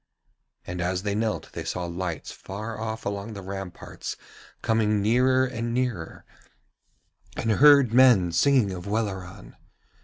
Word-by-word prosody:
And 90 0 -5
as 90 +1 -1
they 100 -1 -1
knelt 110 +1 -2
they - - -5
saw 90 -1 -3
lights 85 -1 -4
far 105 +3 -7
off 110 0 -5
along 100 +2 -4
the 100 -2 -8
ramparts 95 -1 -7 0.5
coming 110 -2 +2
nearer 130 +5 +3
and 120 -2 -3
nearer, 120 -10 -3 1.1
and 115 - 0
heard 140 0 +6
men 120 -9 +6
singing 115 +4 +3
of 90 0 -7
Welleran. 95 - -4
105 Hz, 130 wpm, -26 LUFS, 95-115 Hz, 1.1 s, heard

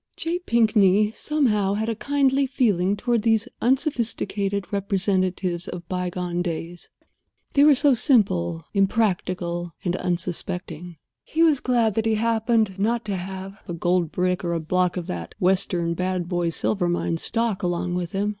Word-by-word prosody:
J. 340 +2 -1
Pinkney, 215 - +3
somehow, 220 -8 0
had 220 +2 -2
a 230 - 0
kindly 275 +3 +1
feeling 205 -8 +1
toward 240 0 0
these 225 +1 +2
unsophisticated 225 - -1
representatives 185 -3 0
of 175 -1 -7
by 180 -1 -2
gone 175 0 -3
days. 170 0 -5 0.6
They 285 - +5
were 295 -1 +7
so 285 +1 +4
simple, 90 - +1
impractical, 185 -4 0
and 175 0 0
unsuspecting. 175 -1 -4 0.3
He 325 +1 +1
was 310 -5 +4
glad 235 -5 +1
that 225 +2 0
he 220 - +2
happened 220 -2 +1
not 230 +2 0
to 205 -2 -2
have 190 +2 -7
a 175 - -4
gold 175 -1 +1
brick 180 0 0
or 170 -1 -1
a 165 - 0
block 180 +3 0
of 175 - -3
that 85 - -6
western 180 -2 +1
Bad 180 0 -2
Boy 175 -2 0
Silver 175 +2 0
Mine 175 -1 -1
stock 230 +2 -1
along 175 0 -1
with 175 -1 -3
him. 200 +2 0
195 Hz, 155 wpm, -24 LUFS, 175-225 Hz, 0.6 s, were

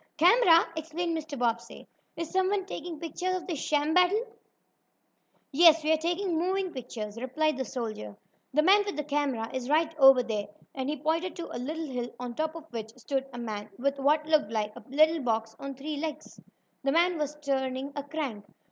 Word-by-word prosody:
"Camera!" 345 0 +6
exclaimed 325 +2 -2
Mr. 310 -2 -5
Bobbsey. 235 -1 -2 0.3
"Is 335 -1 -5
someone 380 +1 +1
taking 345 -4 -6
pictures 355 +3 -2
of 360 -2 -4
this 335 -6 -3
sham 295 +1 +1
battle?" 365 +6 +4 1.3
"Yes, 325 +1 +6
we 310 - +2
are 315 - +5
taking 340 +1 -1
moving 375 +1 0
pictures," 225 -5 -6
replied 305 +5 0
the 265 0 -3
soldier. 215 - -5 0.3
"The 305 +3 +3
man 400 +4 +6
with 405 -4 -5
the 300 - -1
camera 280 -6 -1
is 260 0 -4
right 315 +2 +2
over 270 -2 +8
there," 215 -4 -3 0.3
and 265 0 -3
he 300 - -2
pointed 325 +5 -1
to 340 - -6
a - - -3
little 315 +5 -3
hill, 250 -4 -4
on 245 -1 -5
top 315 +5 -2
of 325 -2 -8
which 225 -1 -6
stood 270 +2 -2
a 245 - -9
man 215 -3 -5
with 275 +2 -1
what 300 +3 +3
looked 310 -8 +2
like 215 -1 -2
a 245 - -11
little 310 +4 +4
box 225 -2 -1
on 275 -1 -6
three 295 +3 -5
legs. 310 0 -6 0.4
The 275 - +2
man 340 +2 +3
was 300 0 -2
turning 270 -1 -2
a 285 - -2
crank. 280 -7 -4
295 Hz, 190 wpm, -29 LUFS, 255-330 Hz, 1.3 s, over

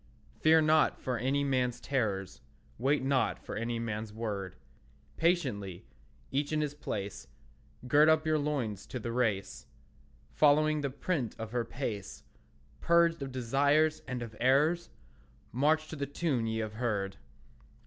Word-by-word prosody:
Fear 160 0 +6
not 155 0 +3
for 125 -3 -2
any 135 +4 +1
man's 130 -3 0
terrors; 105 -8 -2 0.4
Wait 135 +3 +2
not 135 -1 +1
for - - -8
any 115 +2 -2
man's 110 -2 -4
word; 100 -4 -4 0.6
Patiently, 125 - 0 0.5
each 145 +2 -1
in 155 - +1
his 150 -1 -2
place, 105 -9 -5 0.6
Gird 150 +4 +6
up 160 0 +3
your 155 -1 +2
loins 130 -9 -2
to - - -5
the 115 +1 -4
race; 115 -5 -1 0.6
Following 155 +1 +4
the 140 - -1
print 135 - -2
of 110 -1 -6
her 120 -1 0
pace, 115 -5 -5 0.6
Purged 170 -1 +3
of 135 -1 -4
desires 145 +5 +2
and 125 -2 -3
of 110 -2 -9
errors, 150 +7 +3 0.6
March 155 +6 +2
to - - -6
the 140 -1 -3
tune 140 -5 -1
ye 110 0 -1
have 110 -1 -4
heard. 100 -5 -1
130 Hz, 145 wpm, -31 LUFS, 110-150 Hz, 0.6 s, Fear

